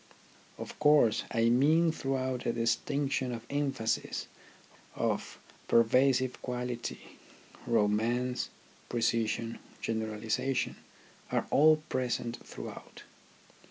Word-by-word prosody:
Of - - -8
course, 150 -7 +4
I 115 -1 +2
mean 155 +7 +4
throughout 130 -4 -2
a - - +1
distinction 130 +3 0
of 115 -1 -6
emphasis, 140 -6 -1 0.7
of - - -2 0.3
pervasive 130 +2 +3
quality 125 -1 -5 0.5
romance, 115 +3 +1 0.4
pre 120 - -2
cision, 115 0 0 0.2
generalization, 110 +3 -1 0.5
are - - +1
all 155 +1 +5
present 120 -3 -2
throughout. - - -9
125 Hz, 90 wpm, -31 LUFS, 115-135 Hz, 0.7 s, all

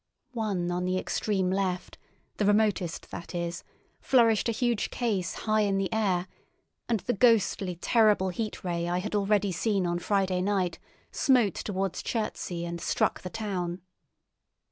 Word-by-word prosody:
One 200 -7 -1
on 180 +1 -1
the 185 0 0
extreme 190 -1 0
left, 185 -2 -2 0.4
the 210 - +1
remotest 205 -5 +1
that 170 - -7
is, 170 0 -3 0.4
flourished 230 -3 +3
a - - +3
huge 235 -1 0
case 200 -7 -1
high 215 0 +3
in 200 -2 +1
the 195 +3 -1
air, 190 -5 +1 0.6
and 225 -4 +1
the 245 - -1
ghostly, 205 -5 +3
terrible 210 0 +3
Heat 215 +4 -4
Ray 170 -1 -1
I 175 - 0
had 200 +4 -3
already 205 -1 +2
seen 195 +1 0
on 175 0 0
Friday 190 -1 +1
night 185 -3 0 0.3
smote 245 - +3
towards 190 -2 -3
Chertsey, 185 -6 -3
and 170 0 -5
struck - - 0
the 180 - -6
town. 185 -5 -3
195 Hz, 150 wpm, -28 LUFS, 180-215 Hz, 0.6 s, flourished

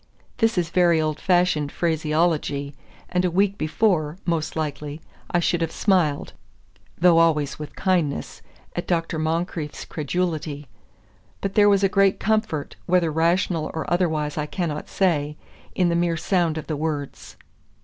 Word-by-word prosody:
This 225 -3 +2
is 170 -2 0
very 175 -2 +4
old 155 -1 -1
fashioned 175 -6 +2
phraseology, 155 -3 0 0.4
and 180 0 +1
a 180 - +2
week 195 +3 +2
before, 155 -2 0
most 165 -3 -1
likely, 150 -1 -4 0.3
I 175 - +2
should 175 0 +1
have 165 -1 -1
smiled 175 -8 +1 0.6
(though 170 -1 +5
always 150 -4 +2
with 150 - -8
kindness) 175 -7 -1 0.3
at 175 - -3
Dr. 165 -2 -1
Moncrieff's 160 -1 -2
credulity; 155 -2 -3 0.7
but 195 -1 -3
there 205 0 +5
was 200 -1 +3
a - - +6
great 195 0 +3
comfort, 215 -9 -1
whether 175 -2 +3
rational 165 0 +1
or 160 - -2
otherwise 155 -4 0
I 150 - -2
cannot 155 -3 -3
say, 150 -6 0 0.4
in 180 -2 +2
the 170 - +1
mere 170 -1 +1
sound 170 -2 +1
of 155 - -5
the 155 - -3
words. 150 -2 -4
165 Hz, 150 wpm, -23 LUFS, 155-180 Hz, 0.7 s, a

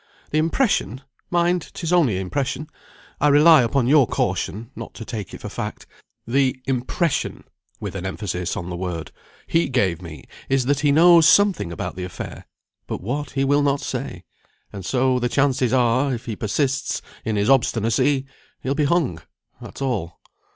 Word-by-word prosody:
The 155 - +2
impression 160 - 0 0.3
(mind, 175 0 +1
'tis 170 0 -2
only 140 - +3
impression; 135 +9 -3 0.5
I 150 - +3
rely 150 +1 +7
upon 125 +2 +1
your 140 -1 +5
caution, 110 +6 -2
not - - -8
to 115 - -8
take 105 -4 -6
it - - -9
for - - -6
fact) - - -6 0.4
the 130 +2 +1
impression," 135 +5 -1 0.4
with - - -5
an 95 -2 -5
emphasis 95 -2 -3
on 90 -2 -5
the - - -3
word, 85 -2 -4 0.3
"he 165 -2 +1
gave 95 -10 +1
me 80 -3 -9 0.3
is, 135 -2 +2
that 140 +1 +1
he 145 -1 +3
knows 165 +1 +7
something 200 - +3
about 85 - -5
the 90 - -5
affair, 90 - -7 0.4
but - - -4
what, 140 +9 -4
he 135 - +2
will 145 +1 +3
not 140 -1 +1
say; 130 -11 -5 0.5
and 100 - -7
so 130 +4 +1
the 120 0 0
chances 130 -2 +2
are, 130 +2 +2
if 115 - -9
he 115 - -4
persists 135 +6 -1 0.2
in 110 - -1
his 100 0 +1
obstinacy, 130 +2 +2 0.4
he'll 135 - 0
be 150 +1 +1
hung. 140 - +1 0.4
That's - - -7
all." 100 -11 -3
130 Hz, 170 wpm, -22 LUFS, 105-145 Hz, 0.5 s, rely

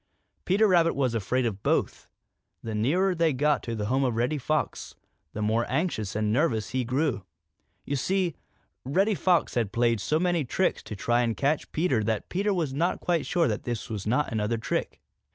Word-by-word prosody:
Peter 205 +4 +4
Rabbit 170 -3 +3
was 130 -4 +1
afraid 120 +4 0
of 100 -4 -3
both. - - 0 0.6
The 115 - -4
nearer 175 - +1
he 165 -2 +2
got 145 +2 +2
to 115 - -4
the 105 -1 -3
home 130 +5 +1
of 125 -3 0
Reddy 125 +6 0
Fox, 155 +3 -2 0.4
the 105 - -3
more 110 +2 +2
anxious 130 - -1
and 105 0 0
nervous 115 -6 +1
he 130 0 0
grew. 130 - -1 0.6
You 140 - -2
see, 180 +4 0 0.5
Reddy 190 - +2
Fox 180 -2 +2
had 115 -5 0
played 115 -1 +1
so 155 +8 +1
many 175 -2 +1
tricks 180 +9 0
to 105 - -6
try 120 +4 +1
and 115 -2 -1
catch 145 +2 0
Peter 155 -9 +1
that 110 0 -2
Peter 200 +3 0
was 165 -8 -1
not 170 +6 0
quite 170 -3 0
sure 170 -2 +2
that - - -2
this 120 -3 -5
was 105 -2 -4
not 125 +7 +1
another 110 +1 0
trick. 115 - -3
130 Hz, 190 wpm, -27 LUFS, 115-165 Hz, 0.6 s, Peter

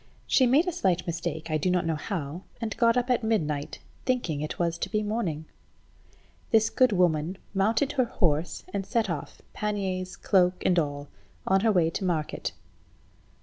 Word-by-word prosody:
She 260 - +4
made 290 +9 +4
a - - +1
slight 185 - 0
mistake, 165 -1 -4
I 155 - +2
do 185 - +1
not 180 -1 +1
know 165 - +1
how, 160 -1 -4 0.2
and 225 -2 -3
got 230 0 +3
up 250 +1 +1
at 245 -1 +2
midnight, 150 -10 -1 0.3
thinking 210 - -1
it 150 - -3
to 170 +1 -1
be 215 +1 0
morning. 195 -8 -2 1.0
This 220 0 +4
good 255 -2 +4
woman 175 -2 +1 0.2
mounted 225 +8 +2
her 255 -2 +2
horse, 165 -7 0
and 200 -1 -1
set 220 -1 0
off, 150 -4 -6
panniers, 190 -3 -2
cloak, 180 -2 +2
and 180 -1 +4
all, 145 -2 -3 0.4
on 190 0 +4
her 220 +1 +3
way 170 -5 +3
to 190 - -3
market. 165 -5 -1
185 Hz, 170 wpm, -27 LUFS, 165-225 Hz, 1.0 s, She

